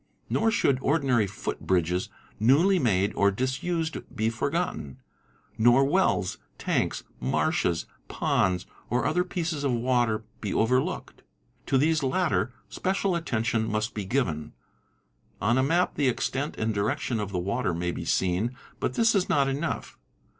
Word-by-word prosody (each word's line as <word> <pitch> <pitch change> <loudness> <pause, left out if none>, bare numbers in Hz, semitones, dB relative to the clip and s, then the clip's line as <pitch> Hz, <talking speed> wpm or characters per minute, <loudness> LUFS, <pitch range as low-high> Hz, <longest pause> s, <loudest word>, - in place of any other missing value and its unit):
Nor 225 - +3
should 140 - +2
ordinary 135 -8 +2
foot 100 - -5
bridges 90 0 0 0.3
newly 160 - +4
made 100 - +2
or 100 - +3
disused 155 - -1 0.2
be 110 -1 +1
forgotten; 130 - -2 0.6
nor 120 +4 +6
wells, 135 - +1 0.2
tanks, - - -1 0.2
marshes, 85 - 0
| - - -38
ponds, 90 -1 +1 0.2
or 125 - +1
other 180 +3 +2
pieces 165 -5 -3
of 140 - +1
water 120 -2 +1 0.2
be 105 - -3
overlooked. 125 +4 0 0.5
To 135 - +3
these 155 +3 +3
latter 130 - +1 0.2
special 190 - -1
al 170 - -1
Ftion 115 -5 0
must 110 +2 -1
be 105 - -3
given. 95 - -1 0.9
On 120 +6 +2
a - - +4
map 165 +7 +2
the 140 -3 +2
extent 135 +4 -2
and 110 0 0
direction 110 +3 -1
of 100 -1 -3
the 95 - -2
water 100 +5 -1
may 85 +1 -1
be - - -5
seen, 95 +7 0 0.2
but - - -1
this 230 -3 +4
is 195 -3 +1
not 140 -2 +3
enough. 140 - -3
125 Hz, 150 wpm, -27 LUFS, 100-155 Hz, 0.9 s, nor